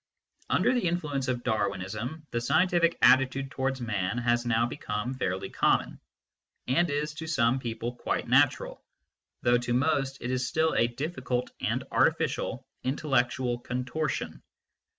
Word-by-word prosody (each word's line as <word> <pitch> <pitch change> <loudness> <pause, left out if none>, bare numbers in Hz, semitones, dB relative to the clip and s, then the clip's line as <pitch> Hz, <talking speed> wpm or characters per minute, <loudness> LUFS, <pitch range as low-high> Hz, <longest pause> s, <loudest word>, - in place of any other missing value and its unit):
Under - - +3
the 245 -8 +1
influence 150 -6 -1
of 125 -1 -1
Darwinism 110 - -2
the 120 - -1
scientific 170 +5 +2
atti 130 +1 +6
tude 135 +1 -5
towards 135 0 -1
man 105 -2 -1
has 120 0 +1
now 115 0 +3
become 120 -1 -3
fairly 95 -8 -2
common, - - +1 0.7
and 165 +7 +2
is 150 +1 -1
to 160 +1 -7
some 130 -4 +2
people 120 -1 -4
quite 120 - -2
natural, - - +2 0.6
though 120 0 +4
to 120 0 -1
most 135 0 +1
it 125 - -3
is 130 0 0
still 160 +3 +1
a 115 - +3
difficult 125 -1 -3
and - - -1
artificial - - +1 0.2
intellectual 130 -3 0
contortion. 125 +5 -3
130 Hz, 140 wpm, -28 LUFS, 120-145 Hz, 0.7 s, atti